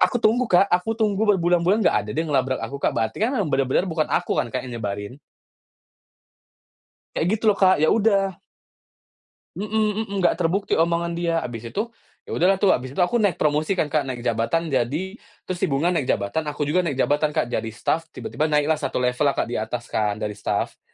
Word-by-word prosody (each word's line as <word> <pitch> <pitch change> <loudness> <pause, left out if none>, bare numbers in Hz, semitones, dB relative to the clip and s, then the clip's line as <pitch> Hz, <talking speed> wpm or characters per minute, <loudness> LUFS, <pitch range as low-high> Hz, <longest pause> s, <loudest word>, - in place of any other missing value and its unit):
aku - - +3
tunggu, 240 +4 +3
Kak. 180 +2 +5
Aku 180 +5 +2
tunggu 215 -3 0 0.2
berbulan-bulan 175 +3 +2
enggak - - +4
ada 105 - -7
dia 160 - +1
ngelabrak 130 -2 +1
aku, 140 - -6
Kak. - - +1
Berarti 110 - -1
kan, 225 - +3
memang 195 -9 0
bener-bener 135 +6 +2
bukan 160 -2 -1
aku - - 0
kan, 120 - -3
Kak, 130 0 -2
yang 120 - -6
nyebarin. 100 +5 -5 2.0
Kayak 160 - 0
gitu 220 - -10
loh, 200 - -3
Kak. 190 -1 +6
Ya 155 - +5
udah 200 -4 +2 1.2
Mmm 205 +5 -4
mmm, 215 0 0 0.2
nggak - - +2
terbukti 185 +2 0
omongan 170 +1 +1
dia. 170 -1 -1
Habis 115 -1 -6
itu, 225 +3 -2 0.3
ya - - -11
udahlah 185 +3 +3
tuh, 195 0 +3
habis 130 +2 -2
itu - - +1
aku 240 +7 +1
naik 200 -7 +2
promosi 155 +5 +1
kan, 155 -5 -1
Kak, 150 -3 +1
naik 125 -2 -5
jabatan 125 +8 0
jadi 155 - -1 0.2
terus 185 -1 -5
si - - +1
Bunga 150 +5 +1
naik 150 -7 -1
jabatan, 130 +11 -1
aku 145 0 -2
juga 150 +5 +1
naik 165 -7 -1
jabatan, 145 +2 +1
Kak. 120 - 0
Jadi 115 -1 -2
staf, 165 +7 -1
tiba-tiba 155 - -2
naiklah 150 0 +1
1 145 - -4
level 125 +3 +1
lah, 140 - +1
Kak, - - -1
di - - -2
atas 115 +2 -4
kan 105 -1 0
dari 105 0 -4
staf. - - -2
160 Hz, 205 wpm, -23 LUFS, 130-190 Hz, 2.0 s, Kak